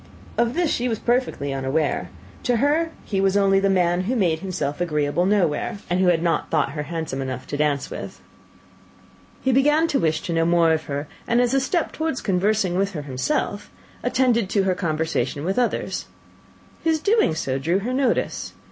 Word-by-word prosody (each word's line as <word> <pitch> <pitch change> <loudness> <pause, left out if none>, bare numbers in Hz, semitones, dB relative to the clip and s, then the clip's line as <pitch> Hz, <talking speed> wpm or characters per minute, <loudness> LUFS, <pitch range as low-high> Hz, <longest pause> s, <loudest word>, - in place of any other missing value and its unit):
Of 235 +2 +1
this 345 -2 +1
she 245 +1 0
was 225 - -1
perfectly 240 - 0
unaware: 135 +3 -1 0.3
to 245 - +1
her 300 +6 +2 0.2
he 195 -2 -1
was 195 +1 +3
only 195 -1 +4
the 195 0 +2
man 180 -1 +2
who 250 +6 0
made 175 -8 +1
himself 180 -5 -3
agreeable 150 +1 +1
nowhere, 190 -3 +1
and 180 - +2
who 185 - +3
had 170 -2 +3
not 170 -1 0
thought - - +1
her 150 +1 -4
handsome 155 -3 -4
enough 130 -1 -4
to 145 - -4
dance 145 -2 0
with. - - -7 1.2
He 265 - +2
began 295 +5 +4
to 280 - +1
wish 160 -2 +1
to 170 - -3
know 165 0 +2
more 170 -1 +4
of 160 0 -2
her; 145 +1 -4 0.2
and, 235 - +3
as 245 0 +2
a 270 - +4
step 320 +5 0
towards 315 -4 -2
conversing 195 -1 +1
with 200 0 0
her 150 -4 -4
himself, 140 - -2 0.3
attended 235 -6 +2
to 200 -1 +2
her 190 -1 +2
conversation 160 -3 -1
with 190 +6 0
others. 245 - -1 0.8
His 320 -1 +2
doing 405 - +2
so 135 -4 -2
drew 165 +7 +1
her 230 +6 -2
notice. 260 -2 0
185 Hz, 190 wpm, -23 LUFS, 160-240 Hz, 1.2 s, only